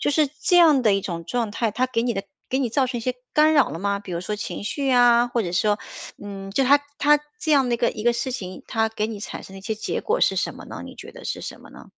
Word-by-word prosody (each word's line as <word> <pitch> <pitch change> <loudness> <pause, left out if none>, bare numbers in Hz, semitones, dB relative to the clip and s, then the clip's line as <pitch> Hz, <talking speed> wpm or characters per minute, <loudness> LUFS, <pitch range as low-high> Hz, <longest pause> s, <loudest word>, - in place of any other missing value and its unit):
就 - - +1
是 300 +1 +3
这 355 - +3
样 310 -6 +6
的 215 -3 +4
一 195 - +2
种 170 -3 -5
状 230 +4 -1
态， 225 +1 -1
它 250 +5 0
给 230 -3 -1
你 240 -1 0
的 195 -1 -4 0.3
给 260 - +1
你 255 -3 0
造 260 +3 +1
成 245 -1 -3
一 - - -5
些 250 +2 -2 0.2
干 310 +1 +5
扰 285 -3 +4
了 165 - -5
吗？ 200 +1 0
比 195 -3 -8
如 170 - -2
说 210 +4 -3
情 205 0 -5
绪 275 +6 -2
呀， 245 -1 +5
或 240 -1 0
者 175 -3 -4
说 205 +3 +2 0.4
嗯， 195 -1 -7
就 265 +7 +1
它 285 +3 +6 0.2
它 295 0 +5 0.2
这 310 - +1
样 270 -3 +4
的 240 - +2
一 - - 0
个 235 - +2
一 215 - -7
个 240 0 +4
事 235 +2 -2
情， 185 -7 -6
它 225 -2 +1
给 215 -1 -1
你 220 -2 -6
产 - - -6
生 190 - -12
的 195 - -8
一 - - -13
些 220 +1 -2
结 215 - -3
果 460 +3 0
是 - - +3
什 - - -1
么 - - -11
呢？ - - -8
你 - - -10
觉 - - -10
得 - - -12
是 - - -3
什 - - -7
么 - - -15
呢？ - - -13
235 Hz, 330 characters per minute, -23 LUFS, 205-265 Hz, 0.4 s, 样